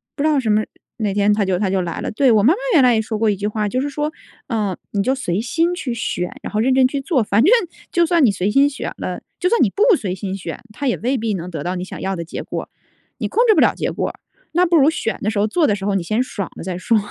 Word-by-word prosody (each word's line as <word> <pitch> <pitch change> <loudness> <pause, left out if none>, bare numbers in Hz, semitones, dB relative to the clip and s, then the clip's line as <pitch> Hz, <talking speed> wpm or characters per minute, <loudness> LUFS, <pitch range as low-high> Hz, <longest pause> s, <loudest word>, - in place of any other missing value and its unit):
不 285 - -2
知 - - +3
道 295 -2 +3
什 225 - -2
么 210 +1 +3 0.3
哪 210 -3 -1
天 205 +1 +3
它 205 -1 +1
就 185 -1 +1
它 200 -2 0
就 190 0 +1
来 170 -2 -4
了。 - - -3
对， 260 +3 +3
我 210 -2 +4
妈 270 +9 +6
妈 - - -4 0.2
原 285 - +6
来 245 -2 +5
也 220 - +2
说 220 0 -4
过 220 0 +2
一 205 - +1
句 205 +2 -3
话， 210 0 -1
就 255 - -1
是 285 - -2
说： 295 +2 -2 0.4
“呃， 210 -6 -1
你 200 - 0
就 260 +4 +1
随 185 -8 -2
心 330 +9 0
去 285 -9 -3
选， 195 -6 -2
然 - - -6
后 210 - +1
认 255 +4 +3
真 260 -1 +5
去 280 +1 -3
做。 270 -3 +1
“反 205 +1 +2
正 355 - +5 0.4
就 345 -1 +4
算 335 -3 +3
你 - - +5
随 195 +1 -1
心 275 +5 +4
选 290 - -5
了， - - -5 0.2
就 360 - +1
算 470 - +3
你 - - +3
不 435 +1 +4
随 190 -8 -3
心 190 0 -4
选， 185 - -6
它 285 - -5
也 245 - +1
未 260 +3 0
必 225 -2 -1
能 180 -1 -4
得 155 -4 -5
到 180 +3 -2
你 180 0 -4
想 - - -8
要 195 0 -2
的 170 - -5
结 165 - -6
果， - - -5 0.5
你 - - -1
控 475 +3 +2
制 435 - +6
不 - - +4
了 - - +4
结 - - -2
果 - - -2
儿， - - -12 0.3
那 355 +2 +3
不 345 -1 +2
如 290 0 +5
选 270 -8 -2
的 210 - 0
时 215 - -1
候、 210 - +2
做 320 +8 +2
的 210 - +2
时 195 - -6
候 200 -1 0
你 190 - 0
先 215 +8 0
爽 210 -7 -4
了 - - -7
再 185 -2 -3
说。 225 +5 +2
220 Hz, 335 characters per minute, -20 LUFS, 195-280 Hz, 0.5 s, 妈